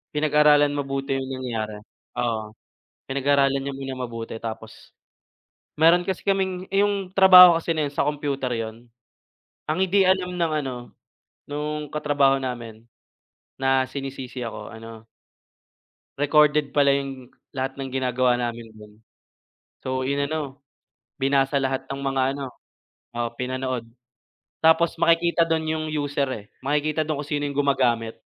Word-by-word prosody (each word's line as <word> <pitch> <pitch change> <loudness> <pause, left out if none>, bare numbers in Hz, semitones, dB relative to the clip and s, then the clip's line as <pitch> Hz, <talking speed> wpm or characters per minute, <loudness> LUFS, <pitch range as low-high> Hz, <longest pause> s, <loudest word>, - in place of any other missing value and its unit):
pinag-aralan 150 -1 +4
mabuti 135 -1 -2
yung 135 0 -3
nangyari 115 -5 -4 0.4
oo 110 -3 -2 0.6
pinag-aralan 140 0 +2
niya 140 +1 -4
muna 135 -1 -5
mabuti 115 -2 -6
tapos 110 -1 -8 0.9
mayroon 170 +2 +5
kasi 190 -2 -2
kaming 190 -2 -1
yung 200 -1 +1
trabaho 180 -3 +9
kasi 165 0 -1
na 150 -2 0
yun 140 - -10
sa - - +1
kompyuter 140 -3 -2
yun, 115 +1 -6 0.8
ang 155 +2 0
hindi 190 +1 +3
alam 185 -1 +1
ng 170 -2 0
ano 130 -1 -4 0.7
nung 150 +1 -4
katrabaho 145 -2 +2
namin 115 -4 -6 0.8
na 135 0 +3
sinisisi 135 -2 -6
ako 115 0 -7
ano 115 0 -11 1.1
recorded 150 0 +3
pala 140 -1 +4
yung 135 -2 -4 0.2
lahat 135 0 -3
ng 135 -1 -6
ginagawa 125 -1 +1
namin 120 -1 -4
do'n. 105 -1 -15 0.9
So, 130 0 -2
inano, 140 0 -2 0.5
binasa 135 0 +1
lahat 135 -1 -1
ng 140 0 -5
mga 135 -1 0
ano 135 -2 -6 0.6
oo, 120 0 -2
pinanood 130 -1 -3 0.8
tapos 160 +1 +4
makikita 170 0 +3
do'n 160 -1 -1
yung 155 - -3
user, 145 -1 -1
eh, 105 -4 -8 0.2
makikita 150 +2 0
do'n 150 -2 -2
kung 145 - -9
sino 145 -1 -1
yung 145 - -3
gumagamit. 120 -5 +1
140 Hz, 130 wpm, -24 LUFS, 130-150 Hz, 1.1 s, trabaho